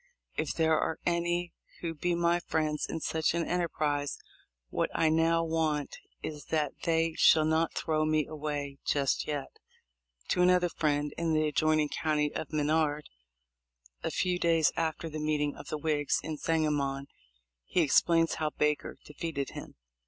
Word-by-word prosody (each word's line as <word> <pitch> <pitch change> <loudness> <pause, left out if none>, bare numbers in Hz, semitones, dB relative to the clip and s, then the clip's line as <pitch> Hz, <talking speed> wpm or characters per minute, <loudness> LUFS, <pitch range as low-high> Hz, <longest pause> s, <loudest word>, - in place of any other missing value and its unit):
If - - -2
there 160 -1 +3
are 160 - -1
any 175 0 0 0.3
who 165 -1 -2
be 175 +3 -1
my 170 0 +2
friends 155 -3 -1
in 165 - -4
such 160 +1 0
an 170 -1 0
enterprise, 150 -5 -1 0.5
what - - 0
I 160 - +3
now 165 +1 +3
want 160 -3 -1 0.3
is 150 -1 -6
that 150 -3 0
they 165 -1 +2
shall 155 -1 +6
not 160 +1 +1
throw 155 -2 0
me 155 -1 +2
away 145 -2 -4
just 140 -2 0
yet."* 145 -2 -4 0.7
To 180 - +2
another 180 0 +4
friend 145 -2 0
in 165 -1 +1
the 155 0 +2
adjoining 155 0 +2
county 150 -2 0
of 160 - -5
Menard 150 0 +1 0.9
a - - -2
few 180 -1 0
days 165 -2 +3
after 165 0 -1
the 155 -1 -5
meeting 150 -1 0
of - - -11
the 155 - -3
Whigs 150 -2 0
in 155 0 -3
Sangamon, 145 -3 0 0.6
he 175 - +1
ex 145 - +5
plains 165 -1 +2
how 155 - +1
Baker 150 0 -1
defeated 150 -2 -4
him. - - -9
155 Hz, 160 wpm, -30 LUFS, 150-165 Hz, 0.9 s, shall